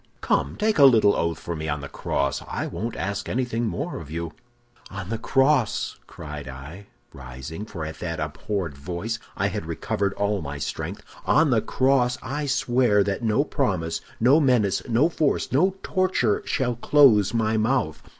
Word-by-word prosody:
Come, -, -, 0 dB
take 215 Hz, -4 st, +1 dB
a 140 Hz, -, +9 dB
little 110 Hz, -6 st, +6 dB
oath 85 Hz, 0 st, -1 dB
for 85 Hz, -, -5 dB
me 80 Hz, 0 st, -4 dB
on 75 Hz, -1 st, -2 dB
the 70 Hz, -, -6 dB
cross; 70 Hz, 0 st, -2 dB
I -, -, -3 dB
won't 115 Hz, +2 st, -4 dB
ask 100 Hz, +1 st, -3 dB
anything 120 Hz, -1 st, -1 dB
more 85 Hz, -, -3 dB
of -, -, -10 dB
you.' 85 Hz, +1 st, -4 dB, 0.6 s
"'On 100 Hz, -2 st, -7 dB
the 115 Hz, 0 st, -2 dB
cross,' 135 Hz, -1 st, +2 dB
cried 75 Hz, -3 st, -8 dB
I, 70 Hz, +10 st, -9 dB, 0.3 s
rising, 65 Hz, +8 st, -8 dB
for 85 Hz, -7 st, -6 dB
at 80 Hz, 0 st, -7 dB
that 85 Hz, -2 st, -4 dB
abhorred 80 Hz, +2 st, -3 dB
voice 90 Hz, +10 st, -4 dB, 0.2 s
I -, -, +1 dB
had -, -, -5 dB
recovered 100 Hz, -1 st, -2 dB
all 100 Hz, -1 st, 0 dB
my 70 Hz, -1 st, -5 dB
strength, 70 Hz, -, -5 dB, 0.2 s
'on -, -, +4 dB
the -, -, +3 dB
cross 130 Hz, -2 st, +2 dB
I 145 Hz, +4 st, -3 dB
swear 120 Hz, -5 st, +3 dB
that 100 Hz, +2 st, -2 dB
no 115 Hz, +4 st, +2 dB
promise, 90 Hz, -, -1 dB, 0.2 s
no 130 Hz, +7 st, +5 dB
menace, 125 Hz, -9 st, +2 dB
no 120 Hz, +7 st, +4 dB
force, 160 Hz, -3 st, 0 dB
no 185 Hz, +8 st, +3 dB
torture, 185 Hz, -, +1 dB
shall 125 Hz, -3 st, 0 dB
close 120 Hz, -7 st, +5 dB
my 110 Hz, -1 st, +1 dB
mouth! 110 Hz, -8 st, 0 dB
105 Hz, 170 wpm, -24 LUFS, 80-125 Hz, 0.6 s, a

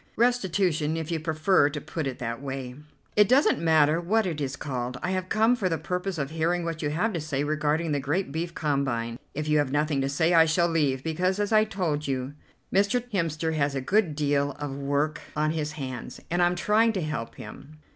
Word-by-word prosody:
Restitution 190 Hz, -9 st, +1 dB
if 160 Hz, +1 st, -4 dB
you 165 Hz, -, 0 dB
prefer 155 Hz, 0 st, +2 dB
to 150 Hz, 0 st, -5 dB
put 155 Hz, 0 st, -4 dB
it 130 Hz, -, -4 dB
that 115 Hz, 0 st, -4 dB
way." 135 Hz, -2 st, -5 dB, 0.4 s
"It 210 Hz, -1 st, +5 dB
doesn't 265 Hz, -, +4 dB
matter 160 Hz, 0 st, +3 dB
what 215 Hz, +5 st, +1 dB
it 160 Hz, -5 st, -3 dB
is 140 Hz, -1 st, -2 dB
called, 125 Hz, -3 st, -4 dB
I 180 Hz, -, -1 dB
have 185 Hz, 0 st, -2 dB
come 225 Hz, +3 st, +3 dB
for 200 Hz, -6 st, -1 dB
the 165 Hz, -, 0 dB
purpose 180 Hz, +1 st, -3 dB
of 140 Hz, -1 st, -3 dB
hearing 165 Hz, +2 st, 0 dB
what 165 Hz, -1 st, -3 dB
you 145 Hz, -, 0 dB
have 180 Hz, +9 st, 0 dB
to 170 Hz, -, -2 dB
say 145 Hz, -2 st, -2 dB
regarding 155 Hz, +2 st, 0 dB
the 145 Hz, -, +1 dB
great 145 Hz, +5 st, -1 dB
beef 170 Hz, +3 st, -4 dB
combine. 130 Hz, -6 st, -1 dB, 0.2 s
If 150 Hz, +1 st, -3 dB
you 150 Hz, 0 st, +3 dB
have 145 Hz, -3 st, 0 dB
nothing 145 Hz, -1 st, +1 dB
to 135 Hz, -, 0 dB
say 160 Hz, +5 st, +2 dB
I 165 Hz, -1 st, +7 dB
shall 170 Hz, +2 st, +2 dB
leave, 145 Hz, -5 st, +1 dB
because, 180 Hz, +4 st, 0 dB
as 205 Hz, 0 st, 0 dB
I 215 Hz, 0 st, +5 dB
told 170 Hz, -9 st, -2 dB
you, 130 Hz, 0 st, -2 dB, 0.4 s
Mr. 215 Hz, +5 st, +2 dB
Hemster 160 Hz, -4 st, -1 dB
has 145 Hz, -2 st, 0 dB
a -, -, 0 dB
good 175 Hz, +3 st, +1 dB
deal 145 Hz, -1 st, +1 dB
of 145 Hz, -2 st, -5 dB
work 145 Hz, +2 st, -1 dB
on 155 Hz, +1 st, +1 dB
his 150 Hz, -2 st, -3 dB
hands, 130 Hz, -4 st, -6 dB
and 175 Hz, +1 st, +1 dB
I'm 175 Hz, 0 st, +3 dB
trying 220 Hz, +4 st, +3 dB
to 190 Hz, -, -2 dB
help 135 Hz, -7 st, -4 dB
him." 145 Hz, +2 st, -11 dB
155 Hz, 215 wpm, -26 LUFS, 140-180 Hz, 0.4 s, I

